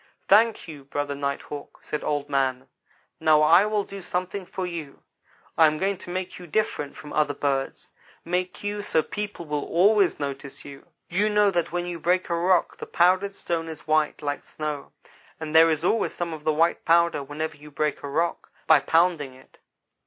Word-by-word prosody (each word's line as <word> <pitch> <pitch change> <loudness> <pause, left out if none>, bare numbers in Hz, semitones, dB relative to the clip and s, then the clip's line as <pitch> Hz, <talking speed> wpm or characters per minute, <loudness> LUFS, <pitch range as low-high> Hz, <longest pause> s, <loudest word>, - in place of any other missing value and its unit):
"'Thank 220 +1 +4
you, 150 -4 -9
Brother 145 +1 -3
Night 140 0 -3
hawk, 145 -1 -9
' - - -32
said 150 - -4
Old 145 -1 -1
man, 135 -2 0 0.5
'now 155 -1 +4
I 170 +6 +6
will 210 -1 0
do 195 0 -9
something 180 +1 -3
for 185 - -4
you. 165 -5 -7 0.6
I 160 - +8
am 155 0 0
going 195 +3 0
to - - -9
make 185 +1 -4
you 180 - -10
different 155 -5 -1
from 150 - -10
other 150 -2 +1
birds 135 -1 -2 0.3
make 180 +3 -2
you 205 0 -2
so 160 -6 +1
people 205 -4 -5
will 150 -1 -2
always 195 +2 +3
notice 140 -1 -6
you.' 140 -1 -11 0.2
"You 205 +5 +1
know 210 -1 +4
that 175 -2 -1
when 175 0 -2
you 175 -1 -5
break 180 +2 +1
a - - +2
rock 175 +1 +2
the - - -8
powdered 185 +3 +2
stone 165 -3 -3
is 160 - -9
white, 155 -1 +1
like 145 0 -2
snow; 150 -2 -5 0.5
and 160 0 -5
there 165 +1 +8
is 160 0 0
always 220 +5 +1
some 170 -1 -3
of 155 -1 -9
the 155 - +3
white 165 +3 +2
powder 170 -2 +3
whenever 150 +3 -5
you 150 +1 -13
break 150 0 -2
a 140 - -6
rock, 165 +4 -1 0.2
by 160 -2 +6
pounding 160 -4 +1
it. 130 - -20
165 Hz, 195 wpm, -25 LUFS, 145-180 Hz, 0.6 s, I